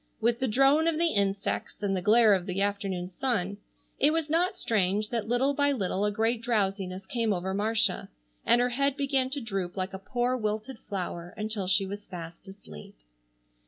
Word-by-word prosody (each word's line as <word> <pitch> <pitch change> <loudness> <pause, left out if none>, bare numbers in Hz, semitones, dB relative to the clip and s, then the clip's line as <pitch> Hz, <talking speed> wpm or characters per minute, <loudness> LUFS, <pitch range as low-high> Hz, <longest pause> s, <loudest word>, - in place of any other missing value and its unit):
With 235 +1 +1
the 260 - 0
drone 275 +7 +4
of 330 -2 +1
the 335 0 +2
insects 200 0 -1
and 195 -1 +1
the 185 - -1
glare 215 +2 +5
of 185 -2 0
the 185 +1 -2
afternoon 195 -3 -1
sun, 200 -1 -1 0.4
it - - +5
was 320 -1 -1
not 360 +4 +1
strange 210 - +1
that 230 -3 -2
little 250 +4 +2
by 285 0 +2
little 200 -5 -1
a 210 - +1
great 225 +2 0
drowsiness 195 -5 -1
came 230 +2 -1
over 190 0 -2
Marcia 215 -1 0 0.3
and 240 - +4
her 245 0 +2
head 275 +2 0
began 275 -2 +1
to 285 +2 -2
droop 195 -7 -4
like 190 +1 -3
a 190 - -5
poor 245 +5 -1
wilted 220 +2 -3
flower 175 -3 -5
until 215 -3 -2
she 195 +1 +3
was 205 +2 -7
fast 170 +1 -9
asleep. 190 - -12
210 Hz, 190 wpm, -28 LUFS, 195-250 Hz, 0.4 s, glare